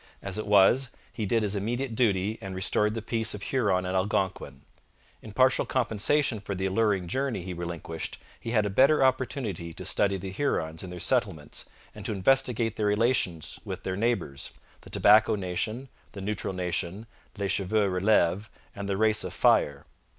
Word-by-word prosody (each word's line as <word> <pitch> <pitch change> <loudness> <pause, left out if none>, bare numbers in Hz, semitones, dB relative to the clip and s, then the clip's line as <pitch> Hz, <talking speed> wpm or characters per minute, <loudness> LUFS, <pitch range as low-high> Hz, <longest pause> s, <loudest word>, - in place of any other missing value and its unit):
As 100 +1 -3
it 110 - -4
was, 105 +6 +5 0.2
he 110 -3 -3
did 115 +3 +2
his 105 -1 -1
immediate 120 +5 -2
duty 110 -2 +1
and 95 -1 -6
restored 105 +3 +1
the 115 - -4
peace 110 -1 -1
of 100 - -8
Huron 100 -8 +1
and 90 +1 -2
Algonquin. 95 -8 -1 0.6
In 110 - -10
partial 130 +4 +3
compensation 120 +1 +1
for 100 -1 -5
the 95 +1 -2
alluring 95 -2 +1
journey 130 -2 -2
he 90 0 -5
relinquished, 85 -2 -5 0.2
he - - -6
had 110 -3 +2
a 100 - -2
better 135 +7 +5
opportunity 115 - -1
to - - -7
study 100 -1 +2
the 95 +1 -6
Hurons 80 - -1
in 95 - -7
their 90 0 -7
settlements 95 - -2 0.2
and 105 - -10
to 110 - -2
investigate 115 +2 +1
their 105 - +1
relations 105 - 0
with - - -6
their 95 - -2
neighbours 100 - -2 0.3
the - - -14
Tobacco 110 +1 +5
Nation, 105 +7 -3 0.3
the 100 - -7
Neutral 100 -1 -3
Nation, 90 +3 -3 0.3
les 100 -1 -2
Cheveux 100 +2 +1
Releves, 95 +1 +2 0.3
and 100 -1 -5
the 95 - 0
Race 110 0 +3
of - - -6
Fire. 70 -1 +3
105 Hz, 175 wpm, -27 LUFS, 95-115 Hz, 0.6 s, was